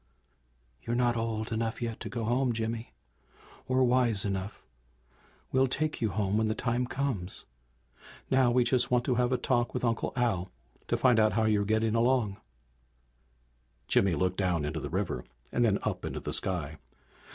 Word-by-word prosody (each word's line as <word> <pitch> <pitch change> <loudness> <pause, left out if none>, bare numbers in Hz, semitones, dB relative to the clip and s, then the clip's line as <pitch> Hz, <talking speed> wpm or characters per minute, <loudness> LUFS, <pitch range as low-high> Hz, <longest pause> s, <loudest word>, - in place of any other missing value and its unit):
"You're 120 - -2
not 120 -1 +2
old 115 -1 -2
enough 115 0 -2
yet 115 -2 -4
to - - -6
go 120 -2 -4
home, 120 +2 +1
Jimmy! 115 - -3 0.8
Or 130 0 +3
wise 120 -5 +3
enough. 100 +1 -4 0.9
We'll 130 +1 +3
take 150 +3 -2
you 110 - +1
home 100 +1 0
when 110 0 +2
the 110 - -1
time 120 +1 -1
comes. 125 -10 -3 0.9
Now 130 -2 +4
we 125 +1 +3
just 125 0 +2
want 125 0 +2
to 130 - +2
have 125 +1 +1
a 130 - +2
talk 120 -1 0
with 125 - -1
Uncle 115 -1 0
Al, 110 -7 0 0.4
to - - +1
find 125 -4 +4
out 110 0 +4
how 110 0 +2
you're 105 -2 +2
getting 110 +1 +1
along." 115 -3 +2 1.5
Jimmy 95 -4 +3
looked 95 +1 0
down 90 -6 0
into 80 +2 -3
the - - -5
river 90 -8 -2 0.3
and 120 - +1
then 105 -4 +3
up - - -2
into - - -4
the - - -3
sky. 80 -5 -1
115 Hz, 175 wpm, -29 LUFS, 100-125 Hz, 1.5 s, Now